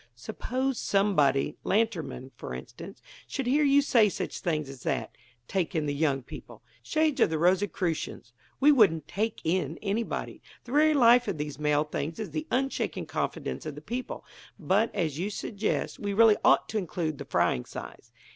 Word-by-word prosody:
"Suppose 255 - -3
somebody 150 -9 +2
Lantermann, 190 - -1
for 65 - -7
instance 65 - -10 0.2
should 270 - -3
hear 285 +5 +3
you 285 0 +5
say 230 -6 +4
such - - -4
things 155 -4 -1
as 135 -2 -10
that: - - -2 0.3
'take 185 -2 -1
in 155 -2 0
the 145 - -1
young 140 -3 0
people'! - - -11 0.2
Shades 310 -4 0
of - - +5
the 160 - -1
Rosicrucians! 175 - 0 0.3
we 290 +2 +6
wouldn't 180 - +4
'take 220 +4 -2
in' 165 -2 0
anybody. 215 +3 -3 0.2
The 240 - -11
very 305 +2 +4
life 245 -2 +6
of 195 -5 -2
these 150 -1 -5
mail 150 0 +2
things 155 +1 -4
is 215 - -5
the 310 0 -4
unshaken 270 +2 -1
confidence - - -3
of - - -5
the - - -9
people. 250 +2 -5 0.3
But, 200 +6 +2
as 160 -6 -1
you 190 +4 -1
suggest, 210 0 -3
we 205 -1 -2
really 220 0 +6
ought - - +5
to 220 - -1
include 160 -5 -3
the - - -6
frying 60 - +1
size." - - -10
195 Hz, 175 wpm, -28 LUFS, 155-235 Hz, 0.3 s, we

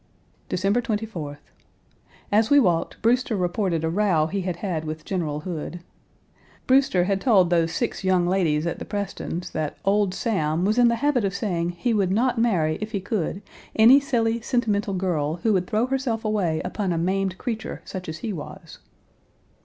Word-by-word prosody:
Page 180 - -2
267 215 +3 +1 0.2
December 150 -4 -5
24th. 145 - -28 0.9
As 215 +2 +3
we 285 - +7
walked, 175 -9 +1
Brewster 240 0 +2
reported 180 -2 -1
a 160 - +1
row 180 -5 +2
he 195 +5 -2
had 180 -1 -2
had 170 -3 -3
with 155 0 -6
General 155 -6 -2
Hood. 175 0 -5 0.8
Brewster 260 -9 +4
had 195 +1 0
told 195 -9 +4
those 165 -1 +2
six 235 +1 -2
young 185 -2 +3
ladies 170 -4 +1
at 170 - -3
the - - -5
Prestons' 200 -3 -4
that 155 -2 -3
"old 200 -1 +2
Sam" 175 -7 0
was 215 +4 +2
in 245 - +6
the 235 - +3
habit 275 -6 +2
of 195 0 -1
saying 175 -5 -1
he 235 +6 0
would 200 -4 +2
not 240 +4 +1
marry 165 -9 +1
if 215 +1 -5
he 200 - 0
could 195 -1 -3 0.3
any 235 +5 +8
silly, 230 -4 0
sentimental 215 -5 0
girl, 165 -5 -1
who 220 - +3
would 180 -2 0
throw 215 +3 +1
herself 255 -4 -2
away 190 -7 0
upon 190 +1 -2
a 170 - 0
maimed 190 +2 0
creature 225 -2 -5
such 185 -3 -6
as 160 - -5
he 215 - -2
was. 155 -5 -9
195 Hz, 185 wpm, -24 LUFS, 170-225 Hz, 0.9 s, any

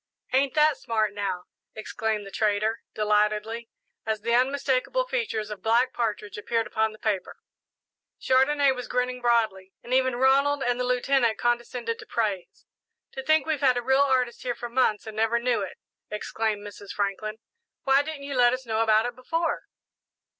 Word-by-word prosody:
"Ain't 270 0 +2
that 305 -1 +4
smart, 215 -3 -1
now!" 195 -3 -3 0.3
exclaimed 215 -1 -3
the 195 - -10
trader, 215 +2 0
delightedly, 215 +2 0 0.3
as 220 -1 -2
the 235 +2 0
unmistakable 270 - +1
features 460 - -2
of 205 -2 -7
Black 240 +4 +2
Partridge 210 -3 -3
appeared 230 +2 -1
upon 220 0 0
the 215 - -13
paper. 210 -4 -2 0.8
Chandonnais 270 +2 +3
was 250 -2 -5
grinning 250 0 -1
broadly, 220 -6 +1
and 245 - -5
even 260 -1 +3
Ronald 275 +3 +3
and 245 0 0
the - - +1
Lieutenant 250 -2 +2
condescended 240 -1 -1
to - - -11
praise. 205 -6 -3 0.5
"To 265 - -6
think 310 +3 +3
that - - -7
we've 305 -3 0
had 255 -3 +4
a 245 - -2
real 265 +2 +3
artist 255 -3 +1
here 245 -2 -2
for 240 0 -6
months 235 -4 +1
and 220 -1 -8
never 225 +1 +2
knew 235 -2 0
it!" 190 - -6 0.3
exclaimed 210 0 -2
Mrs. 205 -1 -10
Franklin. 205 +2 -2 0.5
"Why 270 0 +4
didn't 295 -1 -6
you 280 0 -5
let 245 -1 +5
us 255 0 -4
know 220 -1 0
about 220 0 +4
it 245 0 -4
before?" 330 +7 -2
235 Hz, 175 wpm, -26 LUFS, 215-260 Hz, 0.8 s, let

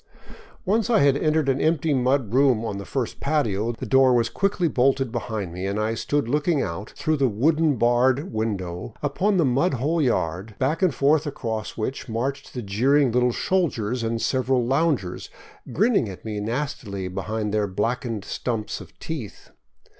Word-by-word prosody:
Once 220 +4 +1
I 230 - +4
had 140 -1 +4
entered 155 0 +1
an 135 0 +1
empty 160 -1 +2
mud 130 -3 +1
room 130 -4 +3
on 100 -3 -3
the 100 - -7
first 120 +6 -3
patio, 120 -7 0
the 115 - -7
door 130 -1 +5
was 115 -1 +2
quickly 195 -3 0
bolted 135 -2 +1
behind 110 -7 -4
me 90 +2 -4
and 100 +2 -2
I 110 +1 0
stood 145 +3 -1
looking 150 +4 +1
out 100 0 -4
through 155 0 0
the 135 -1 +3
wooden 150 +7 +2
barred 125 - +2
window 100 -3 -3
upon 190 +8 +1
the 170 - +3
mud 135 +5 +2
hole 155 +7 0
yard, 100 - -1
back 145 +7 0
and 185 -3 +4
forth 145 +3 +2
across 110 -6 -4
which 125 +3 -4
marched 135 +6 -3
the 125 - -4
jeering 130 +7 +2
little 125 +1 +2
soldiers 125 - 0
and 115 0 -1
several 130 0 +1
loungers, 135 - 0 0.4
grin 220 +9 +2
ning 115 - +2
at 95 - -10
me 105 -1 -3
nastily 115 -4 -3
behind 105 +3 -3
their 105 -1 +1
blackened 115 +2 -2
stumps 115 -4 -3
of - - -14
teeth. 150 - -7
125 Hz, 175 wpm, -24 LUFS, 110-145 Hz, 0.4 s, door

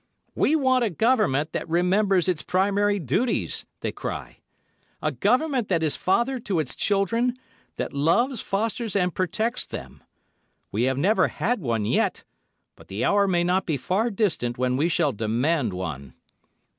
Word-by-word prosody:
"We 310 - +2
want 260 -4 +3
a 225 - +1
Government 195 - +1
that - - -4
remembers 185 +2 +2
its 180 -4 0
primary 200 +2 +1
duties," 195 - -1
they - - -2
cry. - - -6 0.6
"A - - -1
Government 250 +2 +1
that 170 -4 +1
is 155 - +1
father 240 +7 +1
to 195 -7 -1
its 150 -5 -2
children, 230 +5 +1 0.4
that - - -4
loves, 210 - +1
fosters 220 +2 -2
and 180 -3 +1
protects 220 +6 -1
them. - - -8 0.7
We 115 +5 +1
have 130 0 0
never 195 +10 +3
had 245 -3 -1
one 115 -6 -1
yet, - - 0 0.5
but - - -17
the 100 +5 -2
hour 200 0 +3
may 175 -2 +2
not 180 +2 +1
be 155 -4 0
far 195 - 0
distant 185 - -1
when 125 0 0
we 155 +6 +1
shall 165 -4 +2
demand 120 +4 0
one." 75 -8 -6
185 Hz, 155 wpm, -25 LUFS, 140-220 Hz, 0.7 s, want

